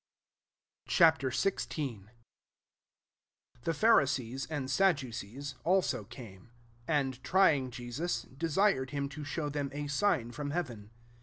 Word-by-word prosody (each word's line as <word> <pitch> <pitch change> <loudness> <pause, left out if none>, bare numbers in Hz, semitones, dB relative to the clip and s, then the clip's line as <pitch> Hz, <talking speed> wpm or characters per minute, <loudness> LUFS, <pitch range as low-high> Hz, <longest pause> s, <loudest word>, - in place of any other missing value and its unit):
Ch. - - 0
XVI. 150 - +2
1 - - -22 1.6
THE - - +2
PharUees, 135 - +2
and 145 -4 -3
Sadducees, 140 - 0
also, 185 +2 +1
came; 105 -5 -12 0.4
oixdt, 135 -4 0
trying 145 -5 +3
Jesus^ 125 +5 -4
desired 165 -3 +2
him 140 +1 -2
to 145 +2 -8
shov/ 145 0 -3
them 145 -2 -2
a 145 +1 -4
sign 145 - +1
from 145 +4 -4
heaven. 125 -11 -4
140 Hz, 110 wpm, -32 LUFS, 130-160 Hz, 1.6 s, trying